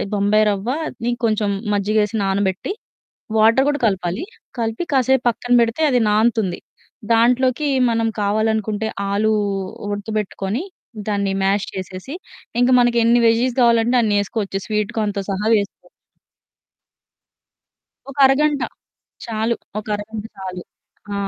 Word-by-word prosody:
బొంబాయి 205 +2 +3
రవ్వని 240 +4 -3
కొంచెం 215 -2 +1 0.3
మజ్జిగేసి 210 +2 +1
నానబెట్టి 195 - -1 0.7
వాటర్ 225 +5 +5
కూడా 290 0 +1
కలపాలి. 190 - -1 0.4
కలిపి 225 +7 -2
కాసేపు 265 0 +3
పక్కన 245 +1 -2
బెడితే 230 +6 0
అది 250 -2 +3
నాన్తుంది. 215 -4 +1 0.5
దాంట్లోకి 250 +5 +3 0.2
మనం 225 0 +1 0.2
కావాలనుకుంటే 215 +1 0 0.2
ఆలు 210 +2 +1 0.6
ఉడకబెట్టుకొని 205 - -3 0.5
దాన్ని 200 -2 0
మ్యాష్ 195 +1 +1
చేసేసి 190 - -7 0.5
ఇంకా 245 +1 +4
మనకెన్ని 240 -1 +4
వెజ్జీస్ 235 +2 +2
కావాలంటే 235 +1 +3
అన్నేసుకోవచ్చు 205 -1 -1
స్వీట్ 210 0 -1
కార్న్‌‌తో 205 -2 -1
సహా 195 +2 -2
వేసుకో 200 -1 -2 2.2
ఒక 275 - -9
అరగంట. 285 +2 +2 0.6
చాలు 225 0 -1 0.2
ఒక 210 - -11
అరగంట 210 +1 -7
చాలు. 185 -2 -6 0.5
ఆ! - - -2
220 Hz, 105 wpm, -20 LUFS, 205-240 Hz, 2.2 s, వాటర్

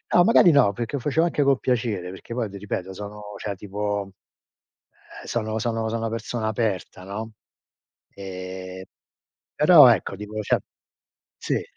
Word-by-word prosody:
No, 175 - +7
magari 185 -6 +6
no, 120 -8 +5
perché 120 +6 -4
lo 125 - -5
facevo 160 +4 +2
anche 150 -4 0
con 140 -1 +3
piacere, 110 -9 -1
perché 95 +5 -10
poi 120 -4 -1
ti 100 - -9
ripeto, 95 -1 -4
sono, 105 +1 -8 0.2
cioè 100 - -4
tipo, 100 0 -3 1.1
eh - - -12
sono 110 -1 -2
sono 115 -1 -1
sono 115 0 -2
una 115 - -1
persona 115 0 -3
aperta, 105 -4 -2
no, 110 +3 -6 0.8
ehm, 95 -1 -7 0.7
però - - +8
ecco, - - +2
tipo, 105 +1 -6
cioè - - +2 0.8
sì, - - -2
105 Hz, 155 wpm, -24 LUFS, 100-115 Hz, 1.1 s, però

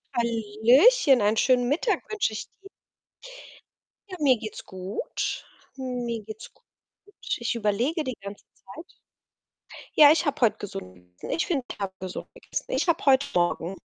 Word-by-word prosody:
Hallöchen, 235 - +4
einen 210 +2 +2
schönen 250 0 +3
Mittag 330 - 0
wünsche 420 - 0
ich 215 - -5 0.2
dir. 390 - -13 1.4
Ja, 370 - -7
mir 270 -4 +4
geht's 215 -1 -8
gut. 190 +2 -4 0.3
Mir 245 -3 -4
geht's 220 +2 -10
gut. - - -32 0.7
Ich 235 0 -2
überlege 235 +9 0
die 255 -3 -5
ganze 200 +1 -9
Zeit. 320 - -14 1.0
Ja, 295 -1 +9
ich 325 +2 +2
habe 290 - -2
heute 230 -3 +3
gesund 90 - -8 0.2
gegessen. - - -8
Ich 335 - 0
finde, 285 -9 -1
ich - - -7
habe 195 -2 -3
gesund 185 -1 -6
gegessen. - - -6
Ich - - 0
habe 335 -1 +1
heut 270 0 +4
Morgen 175 +1 0
240 Hz, 150 wpm, -26 LUFS, 210-290 Hz, 1.4 s, Ja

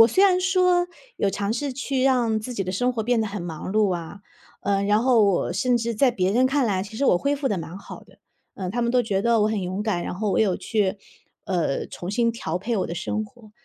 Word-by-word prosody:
我 225 - +9
虽 380 - +4
然 365 -2 +4
说 365 -1 +3 0.3
有 - - +1
尝 200 +2 -2
试 275 +4 -2
去 270 -1 -1
让 240 -5 +2
自 245 +3 -6
己 195 -4 -2
的 185 - -3
生 245 +6 +1
活 220 - -1
变 240 0 +1
得 220 - 0
很 200 -3 -5
忙 165 +1 -6
碌 210 -4 +2
啊， 175 +4 -7 0.4
呃， 200 -1 +1
然 210 +2 +3
后 245 -4 +4
我 190 -3 +1
甚 245 +6 +1
至 235 0 -2
在 255 +4 +4
别 190 -4 0
人 255 +4 +4
看 275 0 +1
来， 190 -3 0
其 210 +2 -9
实 280 - 0
我 180 - +4
恢 285 +8 0
复 275 -1 -3
得 200 - -1
蛮 170 +1 -7
好 - - -11
的， - - -22 0.4
呃， 185 -2 -5
他 240 +3 -1
们 235 - +1
都 250 -1 +4
觉 195 -3 -1
得 235 0 +3
我 215 - +3
很 210 -3 -1
勇 185 +3 -3
敢， 200 -5 -1
然 - - -4
后 205 +2 -1
我 - - +1
有 195 -5 +2
去， 205 -3 -1 0.5
呃， 175 -7 -1
重 180 +2 -7
新 230 +2 +2
调 175 -7 -3
配 225 +5 -2
我 - - -1
的 170 - -5
生 215 +5 -2
活， 215 0 -17
215 Hz, 280 characters per minute, -24 LUFS, 195-245 Hz, 0.5 s, 我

